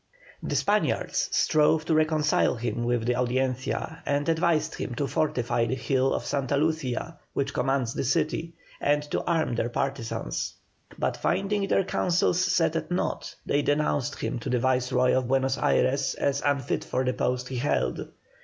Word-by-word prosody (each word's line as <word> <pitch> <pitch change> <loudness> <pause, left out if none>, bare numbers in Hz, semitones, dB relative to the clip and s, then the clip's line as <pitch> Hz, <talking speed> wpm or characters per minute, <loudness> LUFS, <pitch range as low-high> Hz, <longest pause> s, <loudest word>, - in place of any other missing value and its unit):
The - - -3
Spaniards - - +1
strove 155 0 +3
to - - +1
reconcile 155 -3 +2
him 120 0 -2
with 120 -1 0
the 125 - +2
Audiencia, 130 +5 -1
and 145 0 0
advised 160 -1 +1
him 120 - -5
to 140 - -1
fortify 125 -6 0
the 130 - -1
hill 130 +1 +1
of - - -3
Santa 140 0 0
Lucia 155 -1 -1
which 140 0 -1
commands 130 -2 0
the - - -2
city, 160 +4 -1 0.2
and 145 +1 +2
to - - 0
arm 165 -6 +1
their 120 0 -1
partisans; 120 - -3 0.4
but - - -1
finding 195 +2 0
their 195 - +3
counsels 180 -1 +1
set 165 -3 +2
at 165 - -2
nought, 180 - -2
they 145 - +2
denounced 145 -2 0
him - - -2
to 125 - -5
the 125 - +2
Viceroy 125 0 +2
of 130 -1 +1
Buenos 135 0 +1
Ayres 135 +1 +2
as 140 0 0
unfit 140 -3 0
for 130 - -1
the 125 - +1
post 125 +1 -1
he 130 - -4
held. 140 +5 -1
140 Hz, 165 wpm, -27 LUFS, 125-155 Hz, 0.4 s, strove